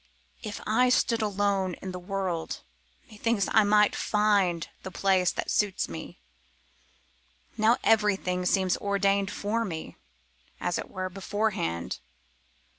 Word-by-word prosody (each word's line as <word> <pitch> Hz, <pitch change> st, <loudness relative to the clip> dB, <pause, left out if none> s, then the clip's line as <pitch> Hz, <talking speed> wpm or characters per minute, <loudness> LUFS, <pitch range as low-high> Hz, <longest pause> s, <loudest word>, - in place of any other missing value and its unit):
If 215 Hz, -2 st, -5 dB
I 250 Hz, +4 st, +3 dB
stood 235 Hz, -2 st, +2 dB
alone 200 Hz, -3 st, 0 dB
in 190 Hz, -, -7 dB
the 180 Hz, -, -6 dB
world 185 Hz, -3 st, -3 dB, 0.5 s
methinks 215 Hz, -1 st, 0 dB
I 220 Hz, -, +6 dB
might 210 Hz, 0 st, +4 dB
find 200 Hz, -6 st, +2 dB
the -, -, -6 dB
place 190 Hz, -1 st, +2 dB
that -, -, -3 dB
suits 205 Hz, -3 st, +1 dB
me; 80 Hz, -1 st, -8 dB, 1.4 s
now 225 Hz, +2 st, +4 dB
everything 195 Hz, -4 st, +2 dB
seems 185 Hz, -1 st, +2 dB
ordained 200 Hz, 0 st, +1 dB
for 215 Hz, +3 st, -1 dB
me, 165 Hz, -7 st, -6 dB, 0.6 s
as -, -, -1 dB
it -, -, -6 dB
were, 185 Hz, -1 st, -4 dB
beforehand. 195 Hz, -, -2 dB
200 Hz, 120 wpm, -28 LUFS, 185-210 Hz, 1.4 s, I